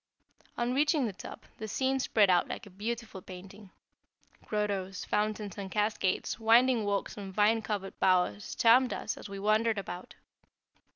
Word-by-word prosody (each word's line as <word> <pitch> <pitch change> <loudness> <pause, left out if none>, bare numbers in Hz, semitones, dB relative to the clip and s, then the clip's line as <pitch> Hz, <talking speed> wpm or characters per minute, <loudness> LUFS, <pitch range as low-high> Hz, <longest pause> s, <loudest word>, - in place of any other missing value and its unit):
On 240 +1 0
reaching 295 0 +2
the 215 - -3
top, 185 - -10
the 220 - -5
scene 265 +5 0
spread 215 -5 +3
out 180 -2 +3
like - - -6
a 200 - -14
beautiful 220 0 -5
painting. 190 +2 -11 0.8
Grottos, 200 -3 -2
fountains, 210 -1 -2
and 195 -1 -5
cascades, 210 0 -1
winding 230 +1 +4
walks 200 +1 -2
and 195 -2 -7
vine 215 +3 +3
covered 205 -3 -4
bowers 180 - +1
charmed 245 +2 +5
us - - -3
as - - -10
we 200 - -6
wandered 215 +2 +2
about. 180 -2 -7
210 Hz, 155 wpm, -30 LUFS, 195-230 Hz, 0.8 s, charmed